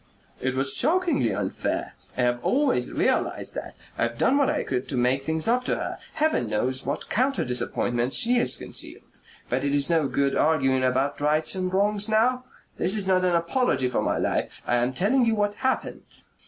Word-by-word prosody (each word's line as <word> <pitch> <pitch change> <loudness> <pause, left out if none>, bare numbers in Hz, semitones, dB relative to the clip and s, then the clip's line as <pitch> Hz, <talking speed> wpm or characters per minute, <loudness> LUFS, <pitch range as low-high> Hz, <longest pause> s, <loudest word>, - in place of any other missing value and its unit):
"It 130 0 -1
was 135 +1 +1
shockingly 320 - +2
unfair. 95 -1 -3 0.2
I 125 - +1
have 120 0 0
always 260 - +1
realized - - 0
that. - - -7 0.2
I've 115 0 -1
done 260 - +2
what 280 - +3
I - - -1
could 125 -1 -3
to 135 - -2
make 125 +2 +1
things 160 +5 -2
up 245 +2 +2
to - - 0
her.... - - -5
Heaven 310 - 0
knows 130 +5 -1
what 140 +2 -3
counter 265 +4 0
disappointments 125 0 0
she 245 +2 +3
has - - +1
concealed.... - - -6 0.4
But - - -1
it 140 0 0
is 140 +3 +2
no 160 -4 +2
good 140 0 0
arguing 135 -4 +2
about 130 +3 0
rights 150 +2 +2
and 185 -1 -2
wrongs 205 +2 +2
now. 250 +4 +2 0.3
This 190 +4 +1
is 200 - 0
not 185 -1 +2
an 180 -1 +2
apology 170 - +1
for 125 - -1
my - - 0
life. - - -2
I 120 - +1
am 120 +1 +1
telling 230 - +2
you 225 -1 +2
what 205 -1 0
happened. 260 +4 -2
155 Hz, 195 wpm, -25 LUFS, -, 0.4 s, what